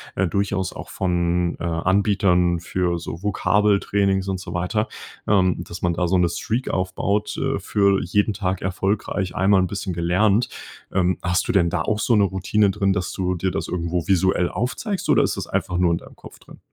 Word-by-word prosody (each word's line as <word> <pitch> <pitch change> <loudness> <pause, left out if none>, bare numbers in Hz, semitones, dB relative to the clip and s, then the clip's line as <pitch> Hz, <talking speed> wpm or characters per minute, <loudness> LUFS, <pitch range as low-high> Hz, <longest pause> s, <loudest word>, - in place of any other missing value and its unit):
äh, 95 - +1
durchaus 100 +1 -1
auch - - -8
von, 90 -1 0
äh, - - -6
Anbietern 90 0 +2
für 90 -1 -1
so 85 0 -7
Vokabeltrainings 100 -1 +1
und 95 -1 -2
so 90 -2 -7
weiter, 95 +5 -1 0.4
ähm, 95 -3 +2
dass 85 +1 -8
man 90 -1 +1
da 90 +1 0
so 95 +2 +2
'ne 90 -1 +3
Streak 115 +8 -2
aufbaut, 95 +3 -1
äh, - - -1
für 100 -1 +2
jeden 105 +4 +1
Tag 95 -2 -2
erfolgreich 95 0 -2
einmal 95 +1 +4
'n 90 - +1
bisschen 95 0 -4
gelernt. 95 +7 +2 0.5
Ähm, 90 -2 +2
hast 90 +1 0
du - - +4
denn 95 -6 +3
da 80 -1 -1
auch 105 +5 -1
so 115 - +2
'ne 105 - +4
Routine 100 +2 +1
drin, 100 -1 +1
dass 90 -2 -2
du 90 -1 -1
dir 95 +2 -1
das - - -3
irgendwo 85 -1 -2
visuell 95 -1 +2
aufzeigst 155 - -3
oder - - +5
ist - - 0
das - - -4
einfach 90 - -2
nur 90 -1 +3
in 85 - +1
deinem - - -13
Kopf - - -14
drin? - - -16
95 Hz, 195 wpm, -22 LUFS, 90-100 Hz, 0.5 s, oder